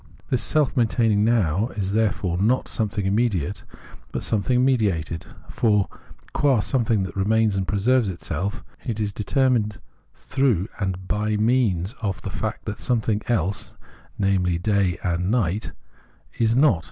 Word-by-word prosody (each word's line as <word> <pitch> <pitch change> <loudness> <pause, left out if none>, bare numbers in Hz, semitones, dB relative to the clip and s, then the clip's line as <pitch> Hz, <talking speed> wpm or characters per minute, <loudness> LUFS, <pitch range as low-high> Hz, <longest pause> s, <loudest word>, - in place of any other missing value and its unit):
This 125 - +2
self 150 -4 +1
maintaining 115 -4 +2
Now 105 -3 +2
is 95 -1 -1
therefore 100 -5 0
not 115 +6 +2
something 105 -3 -2
immediate 100 -4 0 0.5
but - - -3
something 125 +4 +1
mediated; 95 - 0 0.2
for, 105 -4 +2 0.5
qua 135 -5 +3
some 125 +4 +1
thing 110 -3 +1
that 95 - -6
remains 110 +1 +2
and 95 -1 -1
preserves 110 +2 +2
itself, 95 +4 -4 0.2
it 110 -3 -3
is 105 -2 -1
deter 130 +7 +1
mined 105 -4 0 0.4
through 125 -9 0
and 95 -3 -1
hy 105 +2 0
means 105 -4 +1
of 100 -5 -2
the 100 - -4
fact 110 +1 -4
that 105 - -4
something 110 -4 0
else, 100 -5 -1 0.4
namely 95 -3 +1
day 100 0 +1
and 90 -1 0
night, 105 -3 0 0.7
is 115 0 +3
not. 135 - +4
105 Hz, 145 wpm, -23 LUFS, 95-115 Hz, 0.7 s, not